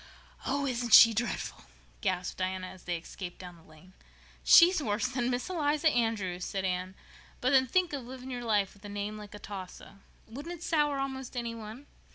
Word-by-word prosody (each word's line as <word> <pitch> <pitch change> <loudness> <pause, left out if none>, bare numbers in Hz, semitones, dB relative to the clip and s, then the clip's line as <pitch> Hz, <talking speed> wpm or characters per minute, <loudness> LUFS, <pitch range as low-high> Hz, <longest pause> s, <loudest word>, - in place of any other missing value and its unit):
"Oh, 280 +1 0
isn't 245 -3 +4
she 230 0 +9
dreadful?" 235 +3 -3 0.4
gasped 185 -3 -2
Diana, 185 0 -2
as 185 0 -11
they 175 -1 -1
escaped 175 +2 -8
down 180 -1 -10
the 165 - -18
lane. 160 +3 -18 0.5
"She's 350 -1 +7
worse 215 -3 -1
than 250 -1 -1
Miss 250 0 -2
Eliza 305 -3 +1
Andrews," 215 -8 -1
said 195 0 -3
Anne. 185 +1 -2 0.4
"But 255 - +1
then 260 -1 +5
think 360 +4 +1
of 265 -4 -5
living 260 0 -9
all - - -4
your 245 - -6
life 210 -4 +1
with 200 - -21
a 205 - -8
name 205 +1 -4
like 210 -1 -10
Atossa! 200 -1 -9 0.3
Wouldn't 290 +10 -7
it 340 - -12
sour 295 -4 +1
almost 265 -2 -4
any 235 -1 -2
one? 225 +4 -9
230 Hz, 195 wpm, -30 LUFS, 190-265 Hz, 0.5 s, she